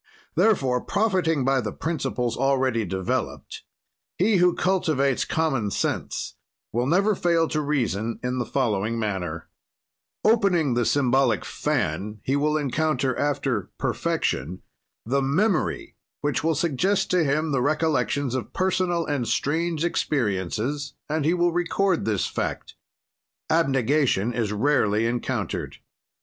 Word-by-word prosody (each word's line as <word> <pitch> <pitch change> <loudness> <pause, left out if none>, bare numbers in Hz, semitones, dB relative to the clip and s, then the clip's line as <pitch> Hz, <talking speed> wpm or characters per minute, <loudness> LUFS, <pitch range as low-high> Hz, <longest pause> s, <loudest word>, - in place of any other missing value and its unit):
"Therefore, 135 - +2
profiting 185 - +1
by 135 -1 +2
the 105 -2 -3
principles 135 -6 -2
already 130 -4 +1
developed, 95 0 -3 0.6
he 200 +2 +3
who 180 0 +4
cultivates 155 -8 +1
common 135 -10 0
sense - - -2 0.4
will 120 +3 0
never 195 +7 +3
fail 170 -3 +2
to 155 - 0
reason 115 -7 -1
in 125 +1 -1
the 120 - -1
following 115 -4 0
manner: 95 -7 -3 0.8
"Opening 195 - +3
the 120 0 +1
symbolic 130 - +2
fan, 100 +8 -2
he 135 - 0
will 150 +2 +1
encounter, 140 -2 0
after 135 -7 -1
perfection, 75 +8 -2 0.4
the 135 +5 +1
memory 180 +10 0 0.2
which 145 0 -1
will 165 0 +2
suggest 170 +6 +1
to 180 -2 +3
him 155 +2 0
the 135 -3 +1
recollections 145 -2 0
of 130 -2 -4
personal 185 -2 0
and 140 -6 -1
strange 165 +2 0
experiences 125 - -1
and 155 -1 0
he 165 +3 +3
will 175 0 +2
record 175 +1 0
this 105 -3 0
fact: - - -4 0.8
abegation 135 -7 +2
is 115 -3 -1
rarely 110 -2 +2
encountered. 120 +1 -2
140 Hz, 125 wpm, -24 LUFS, 120-165 Hz, 0.8 s, who